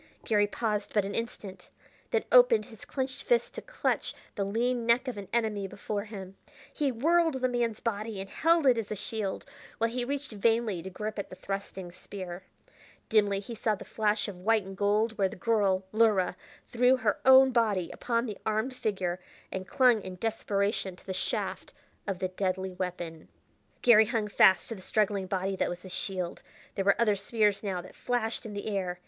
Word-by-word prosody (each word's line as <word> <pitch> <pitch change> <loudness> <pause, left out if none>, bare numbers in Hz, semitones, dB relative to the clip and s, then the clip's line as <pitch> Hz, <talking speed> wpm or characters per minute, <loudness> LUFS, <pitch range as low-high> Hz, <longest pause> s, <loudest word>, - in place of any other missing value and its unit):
Garry 210 -3 +3
paused 210 -1 -2
but 205 -2 +3
an 200 - -4
instant, 215 -4 -5 0.4
then - - +1
opened - - +6
his 225 -4 -13
clenched 260 -1 -3
fists 485 -1 +1
to - - -7
clutch - - -2 0.2
the 200 - -1
lean 235 +4 0
neck 245 +3 +3
of 250 - -3
an 200 -2 -7
enemy 215 -4 0
before 200 +1 -4
him. 195 -3 -8 0.4
He 290 -3 0
whirled 325 +5 +2
the 255 -1 +1
man's 235 -3 -1
body 215 -2 -3
and 195 - -5
held 330 - +2
it 250 -3 +5
as 215 -2 -5
a - - -1
shield 205 -1 -4 0.3
while 230 0 +1
he 245 +1 -1
reached 280 +1 -3
vainly 220 -3 +1
to 190 - -7
grip 210 +3 -5
at 200 - -5
the - - -9
thrusting 190 -1 -5
spear. 185 -1 -8 0.7
Dimly 205 -2 +3
he 205 +4 -7
saw 215 -1 0
the - - -10
flash 215 -1 0
of 190 -3 -7
white 220 +1 +3
and 195 +1 -9
gold 210 +3 +1
where 195 -1 +3
the - - -9
girl, 195 -3 +1
Luhra, 215 -5 +3 0.3
threw 250 +2 +4
her 220 -4 0
own 265 0 +8
body 215 -7 +1
upon 235 0 -1
the 210 -4 -6
armed 220 +4 0
figure 190 -6 -2 0.3
and 190 -1 -5
clung 250 -5 +4
in 185 -1 -7
desperation 200 -2 -1
to - - -20
the 190 - -4
shaft 185 - -3 0.3
of 195 -2 -1
the 185 0 -2
deadly 185 0 -2
weapon. 175 - -5 0.6
Garry 220 -3 +7
hung 225 -3 -1
fast 190 -2 +5
to - - -3
the 195 - -10
struggling 200 -1 0
body, 190 +1 -1
that - - 0
was 175 +1 -6
his 185 - -10
shield; 185 -3 -3 0.3
there 195 - -2
were 200 +2 +4
other 215 -3 +4
spears 205 0 +1
now 190 -4 -2
that 180 - -13
flashed 230 -2 -2
in 210 - -7
the 200 - -5
air. 185 -4 -2
210 Hz, 195 wpm, -29 LUFS, 190-230 Hz, 0.7 s, own